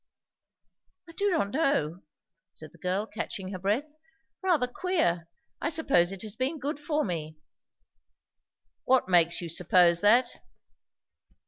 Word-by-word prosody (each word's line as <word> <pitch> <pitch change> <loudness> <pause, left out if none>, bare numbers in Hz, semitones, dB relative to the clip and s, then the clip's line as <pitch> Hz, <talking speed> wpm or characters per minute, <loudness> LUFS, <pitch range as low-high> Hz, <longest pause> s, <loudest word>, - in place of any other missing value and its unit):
"I - - -11
do 400 +5 0
not 315 - 0
know," 190 - 0 0.5
said 155 -1 -10
the - - -20
girl 185 +3 -1
catching 190 -3 -5
her 185 - -6
breath. 225 +11 -1 0.5
"Rather 350 -9 +2
queer. 245 - -1 0.3
I - - 0
suppose 275 - +2
it 195 +1 -6
has 215 -1 -6
been 260 +6 -2
good 290 +1 -4
for 300 0 -1
me." 155 -4 -5 1.5
"What 260 -4 +3
makes 175 -2 +3
you 170 - -5
suppose 170 +1 +3
that?" 240 +4 +3
210 Hz, 130 wpm, -28 LUFS, -, 1.5 s, What